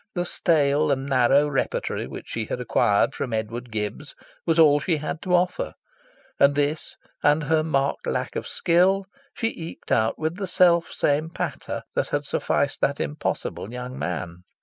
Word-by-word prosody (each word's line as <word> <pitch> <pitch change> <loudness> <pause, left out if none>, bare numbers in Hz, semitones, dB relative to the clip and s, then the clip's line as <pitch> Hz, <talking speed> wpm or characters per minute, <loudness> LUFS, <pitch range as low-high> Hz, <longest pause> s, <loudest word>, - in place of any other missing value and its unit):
The 175 0 0
stale 150 -5 +2
and 135 0 0
narrow 135 +2 +4
repertory 140 -2 -2
which - - -9
she 115 -1 -3
had 125 - -4
acquired 120 0 +2
from 125 - -4
Edward 115 +3 -3
Gibbs 110 +7 -4 0.3
was 165 -1 +2
all 150 -3 +6
she 160 +2 0
had 155 +2 -4
to 180 -2 +2
offer; 180 +1 0 0.7
and 140 0 +5
this, 145 +2 -1 0.3
and 150 +2 +3
her 155 +2 +2
marked 140 -3 0
lack - - -2
of - - -3
skill, 185 +3 +2 0.3
she 225 - 0
eked 165 -1 -9
out 110 0 +2
with 160 +2 -2
the 195 -2 -3
self 175 -2 +4
same 150 +3 +1
"patter" - - -4
that - - 0
had - - -1
sufficed - - 0
that - - +1
impossible 75 +7 -3
young 125 +1 -6
man. 85 -1 -3
145 Hz, 170 wpm, -24 LUFS, 125-165 Hz, 0.7 s, all